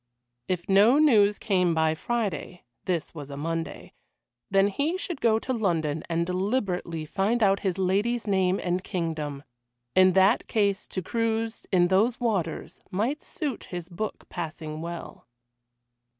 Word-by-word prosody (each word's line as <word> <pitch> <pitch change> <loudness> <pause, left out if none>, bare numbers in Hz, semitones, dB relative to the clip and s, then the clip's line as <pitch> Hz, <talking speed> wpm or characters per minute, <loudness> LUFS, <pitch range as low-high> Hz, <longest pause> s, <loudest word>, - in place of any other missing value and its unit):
If 180 -2 -2
no 205 +7 +6
news 215 -9 +5
came 180 -5 +1
by 160 0 +2
Friday 195 -2 -3 0.2
this 175 -4 -2
was 145 -4 -8
a 140 - -7
Monday 165 +2 -4 0.6
then 195 +1 +4
he 290 - -1
should 350 -6 -5
go 220 -1 +4
to 255 +3 -2
London 165 -9 0
and 170 0 +1
deliberately 180 -4 -1
find 210 +8 +1
out 195 -1 +4
his 190 -2 -1
lady's 205 +5 +1
name 190 -2 +2
and 180 +1 -1
kingdom. 155 -7 -3 0.5
In 185 0 +6
that 195 +4 +4
case 200 -3 0
to 185 - -4
cruise 225 +1 -1
in 175 -2 +4
those 220 +7 +2
waters 195 -10 -2
might 225 +10 -1
suit 300 - -4
his 175 -1 -6
book 200 +5 -5
passing 155 -2 -6
well. 170 -6 -7
190 Hz, 145 wpm, -27 LUFS, 170-220 Hz, 0.6 s, no